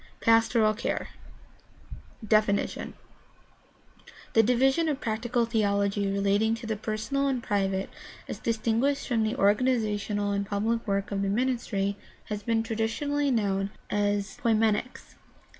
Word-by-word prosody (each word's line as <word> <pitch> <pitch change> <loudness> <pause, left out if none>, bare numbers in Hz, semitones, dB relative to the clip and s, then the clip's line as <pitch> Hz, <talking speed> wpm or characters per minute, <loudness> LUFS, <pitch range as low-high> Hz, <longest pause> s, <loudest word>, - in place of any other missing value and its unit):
PASTORAL 225 -1 +4
CARE 220 - -3
I. 220 - -18
DEFINITION 215 -2 +1 1.4
The 225 - +6
division 265 +8 +2
of 285 -3 -1
practical 235 +1 -1
theology 200 -3 +1
relating 200 +3 +2
to 230 +1 -9
the 220 -1 -1
personal 220 +6 -2
and 255 -3 -1
private 195 -1 0 0.4
as - - -6
distinguished 230 +5 0
from 235 -4 +1
the 220 +2 0
organizational 210 -2 +1
and 200 0 -2
pubHc 220 +3 -1
work 200 0 -1
of 195 -1 -1
the 200 - 0
ministry 210 -4 -1 0.3
has 210 -1 -3
been 225 +1 0
traditionally 235 +6 -1
known 200 -5 0 0.2
as 205 -1 0
poimenics. 225 +1 0
220 Hz, 125 wpm, -27 LUFS, 205-235 Hz, 1.4 s, The